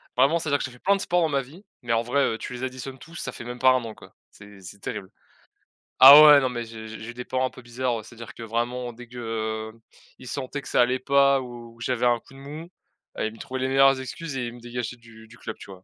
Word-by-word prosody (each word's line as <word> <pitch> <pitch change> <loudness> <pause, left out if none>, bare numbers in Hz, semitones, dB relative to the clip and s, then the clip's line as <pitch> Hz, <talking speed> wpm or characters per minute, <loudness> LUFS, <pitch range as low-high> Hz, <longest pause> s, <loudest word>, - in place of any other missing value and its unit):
Vraiment, 135 +6 +4
c'est-à-dire 145 -3 0
que - - -2
j'ai 130 - -8
fait 125 - -16
plein 200 +1 +3
de 195 - -4
sport 175 -2 +1
dans 160 - +2
ma 140 -1 +1
vie, 165 +11 -15 0.2
mais 115 -1 -1
en 115 - +2
vrai, 140 +4 +1
heu, 110 - 0
tu 125 - -7
les 125 +1 -7
additionnes 130 0 -6
tous, 165 +5 -14
ça - - -4
fait - - -9
même 120 0 -6
pas 130 +1 +6
1 130 -2 +1
an, 110 -1 -7
quoi. - - -16 0.2
C'est 100 -1 -15
c'est 95 +2 -11
terrible. 95 - -6 0.9
Ah 140 +3 +12
ouais, 150 -1 +9
non, 130 - 0
mais 120 -2 -4
j'ai 110 -1 -9
j'ai 110 +2 -8
des 125 0 -7
parents 130 0 0
un - - -7
peu - - -14
bizarres, 120 -2 -3
c'est-à-dire 115 -1 -11
que 115 - -10
vraiment, 120 +2 -3
dès 120 +1 -12
que 110 -2 -4 0.5
ils 130 - -11
sentaient 140 +2 -4
que - - -12
ça - - +1
allait 125 +1 +2
pas 140 0 +3
ou 120 -2 -10
j'avais 125 0 -1
un 120 -1 +3
coup 135 - -20
de 135 - -13
mou, 150 +5 -9 0.5
heu, - - -1
ils 110 - -3
me - - -14
trouvaient 130 +2 -6
les 130 - 0
meilleures 135 0 +4
excuses, 135 +2 -6
et 125 - -2
ils 120 - -7
me 120 - -13
dégageaient 120 0 -5
du 110 -1 -16
du 120 +2 -16
club, 110 - -7
tu - - -12
vois? 95 0 -13
125 Hz, 275 wpm, -25 LUFS, 115-135 Hz, 0.9 s, Ah